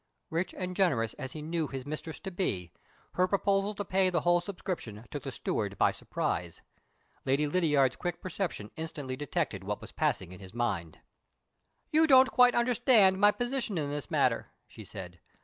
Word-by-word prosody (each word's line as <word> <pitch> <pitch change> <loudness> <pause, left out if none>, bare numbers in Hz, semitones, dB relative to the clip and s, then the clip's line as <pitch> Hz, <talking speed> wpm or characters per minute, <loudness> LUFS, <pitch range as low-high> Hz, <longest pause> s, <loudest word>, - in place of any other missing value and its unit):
Rich 170 +3 -1
and 180 -1 -4
generous 135 - +2
as 130 -2 -5
he 155 - -6
knew 160 0 -1
his 135 -1 -6
mistress 155 0 -5
to 190 - -5
be, 95 - -2 0.4
her 185 0 +2
proposal 200 +1 +1
to 205 - -4
pay 190 0 +2
the 170 -3 +1
whole 175 +1 +3
subscription 175 - -5
took 145 - -4
the 135 - -5
steward 100 -3 -2
by - - +4
surprise. 85 -1 -3 0.6
Lady 140 +3 +2
Lydiard's 145 -5 +2
quick 175 -1 -3
perception 170 - -4
instantly 150 -5 -5
detected 145 0 -2
what - - -3
was - - -11
passing 90 -1 -1
in 90 - -10
his 95 +2 -12
mind. 95 -10 -2 0.9
"You 315 +1 +5
don't 260 -2 +7
quite 250 0 +6
understand 235 -5 +4
my 205 +1 +7
position 245 -4 -1
in 145 -2 -1
this 145 -5 -4
matter," - - +1 0.2
she - - -11
said. 90 -2 -9
165 Hz, 175 wpm, -30 LUFS, 130-195 Hz, 0.9 s, don't